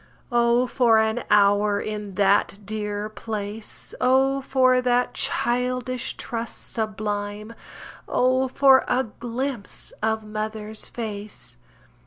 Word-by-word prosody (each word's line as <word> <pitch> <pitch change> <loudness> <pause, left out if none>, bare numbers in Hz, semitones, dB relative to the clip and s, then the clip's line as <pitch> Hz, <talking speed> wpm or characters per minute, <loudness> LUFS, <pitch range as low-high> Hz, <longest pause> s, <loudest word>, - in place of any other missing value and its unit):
Oh, 240 +1 +3
for 240 -2 +3
an 220 +2 +1
hour 205 0 +4
in 210 -2 -5
that 200 0 +3
dear 210 0 -3
place 215 0 -6
Oh, 270 +2 +3
for 255 -1 +3
that 245 0 +1
childish 250 +1 -1
trust 230 -1 -4
sublime 210 0 -3 0.5
Oh, 255 +1 +2
for 265 0 +5
a 260 - +2
glimpse 240 +1 -4
of 220 0 0
mother's 215 0 -5
face! 210 -3 -7
220 Hz, 105 wpm, -24 LUFS, 210-250 Hz, 0.5 s, for